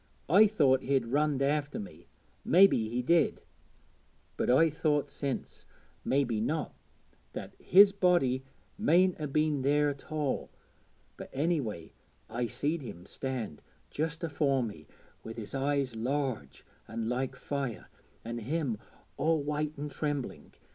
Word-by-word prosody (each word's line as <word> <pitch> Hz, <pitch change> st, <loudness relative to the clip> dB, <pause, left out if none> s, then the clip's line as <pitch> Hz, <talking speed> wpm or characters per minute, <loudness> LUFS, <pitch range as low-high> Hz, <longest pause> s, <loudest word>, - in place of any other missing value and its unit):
I 205 Hz, +7 st, +7 dB
thought 140 Hz, -11 st, +3 dB
he'd 135 Hz, -3 st, +1 dB
runned 140 Hz, +2 st, +1 dB
after 145 Hz, +1 st, 0 dB
me 85 Hz, -4 st, -9 dB, 0.4 s
mebbe 190 Hz, +4 st, +7 dB
he 115 Hz, +3 st, -1 dB
did 165 Hz, +3 st, +3 dB, 1.0 s
but -, -, -1 dB
I've 150 Hz, +5 st, +5 dB
thought 150 Hz, -2 st, 0 dB
since, 140 Hz, -3 st, -5 dB, 0.4 s
mebbe 125 Hz, -6 st, +1 dB
not, 155 Hz, +7 st, -1 dB, 0.6 s
that -, -, -7 dB
his 200 Hz, +2 st, +7 dB
body 175 Hz, -10 st, +2 dB, 0.4 s
mayn't 185 Hz, -4 st, +3 dB
'a 150 Hz, -, -2 dB
been 150 Hz, 0 st, +1 dB
there 145 Hz, +2 st, +3 dB
at 140 Hz, +1 st, -8 dB
all; 150 Hz, -4 st, -1 dB, 0.7 s
but -, -, -8 dB
anyway 135 Hz, -, -2 dB, 0.4 s
I 120 Hz, +1 st, -1 dB
seed 150 Hz, +8 st, -2 dB
him 90 Hz, -9 st, -9 dB
stand 115 Hz, -, -5 dB, 0.3 s
just 160 Hz, +2 st, -3 dB
afore 145 Hz, -4 st, +1 dB
me, 80 Hz, -10 st, -7 dB, 0.4 s
wi' 115 Hz, -, -6 dB
his 115 Hz, -2 st, -8 dB
eyes 135 Hz, -2 st, 0 dB
large 120 Hz, -, -3 dB, 0.2 s
and 115 Hz, 0 st, -4 dB
like 125 Hz, +2 st, -1 dB
fire, 140 Hz, -5 st, -4 dB, 0.4 s
an' 120 Hz, +1 st, -4 dB
him 130 Hz, -2 st, -2 dB, 0.4 s
all 155 Hz, +1 st, +2 dB
white 150 Hz, +1 st, -2 dB
and 145 Hz, +1 st, -5 dB
trembling. 145 Hz, -4 st, -4 dB
140 Hz, 135 wpm, -30 LUFS, 120-155 Hz, 1.0 s, I